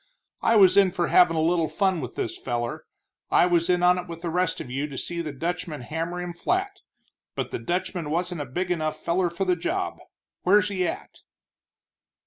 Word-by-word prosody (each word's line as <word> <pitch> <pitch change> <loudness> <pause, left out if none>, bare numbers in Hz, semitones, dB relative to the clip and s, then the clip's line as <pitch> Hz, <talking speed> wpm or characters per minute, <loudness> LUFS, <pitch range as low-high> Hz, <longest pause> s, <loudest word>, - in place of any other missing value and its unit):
I 230 - +3
was 195 -2 +6
in 195 -2 +6
for 175 -1 -1
havin' 175 -2 +5
a 160 - +1
little 165 0 +2
fun 190 -5 +1
with 125 -2 -6
this 115 - -2
feller; 120 -1 -4 0.4
I - - +5
was 175 -1 +2
in 180 0 +2
on 180 0 +5
it - - -7
with 165 -1 -8
the 170 - -2
rest 180 -1 0
of 125 - -7
you 140 +3 -2
to 140 -3 -8
see 170 +4 -2
the 155 -3 -4
Dutchman 165 0 -4
hammer 165 +7 -4
him 180 -1 -4
flat, 375 - -1 0.6
but - - -3
the 375 - -3
Dutchman 175 -2 -2
wasn't 175 0 -1
a - - -3
big 180 +8 -3
enough 155 -3 -1
feller 175 +1 0
for 170 +3 -2
the 180 -1 +2
job. 345 - -2 0.4
Where's 205 +3 +4
he 185 -3 0
at?" - - -6
175 Hz, 205 wpm, -25 LUFS, 160-185 Hz, 0.6 s, was